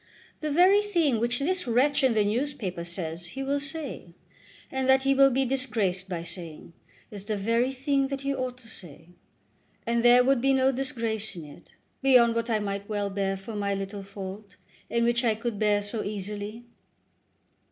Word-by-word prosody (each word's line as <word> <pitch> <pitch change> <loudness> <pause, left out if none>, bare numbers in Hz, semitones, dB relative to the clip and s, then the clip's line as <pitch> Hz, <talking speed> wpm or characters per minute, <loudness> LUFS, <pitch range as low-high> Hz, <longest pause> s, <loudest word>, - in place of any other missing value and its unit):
The 305 - -3
very 365 +7 +5
thing 335 - +1
which 240 +1 +1
this 360 +3 -1
wretch 270 +5 +2
in 255 -4 +3
the 210 -1 +3
newspaper 215 -6 -2
says 170 -1 -4
he 270 - -2
will 280 +1 0
say, 285 - -4 0.6
and 265 0 -1
that 265 0 +5
he 275 0 +3
will 275 0 +6
be 265 +1 +1
disgraced 215 -8 -1
by 170 -2 -3
saying, 170 -2 -7 0.4
is 200 -2 -7
the 215 -1 -2
very 230 +5 +1
thing 275 +1 0
that 275 0 -4
he 275 0 -1
ought 255 -2 -3
to 250 -2 -15
say. 170 -5 -11 0.8
And 235 0 +1
there 245 +1 +7
would 265 -1 +2
be 270 +1 +3
no 265 0 +3
disgrace 230 -6 -3
in 165 -3 -8
it, 145 - -15 0.3
beyond 250 -4 +5
what 230 0 -2
I 220 - +2
might 200 -1 -4
well 205 -1 -2
bear 195 0 -1
for 210 +3 -8
my 200 -1 -1
little 195 +1 -5
fault, 195 +1 -9 0.3
and 235 0 +1
which 240 +1 +2
I 225 -3 +2
could 225 -1 -4
bear 205 -1 +2
so 210 +2 -3
easily." 205 +3 -5
230 Hz, 185 wpm, -27 LUFS, 200-270 Hz, 0.8 s, there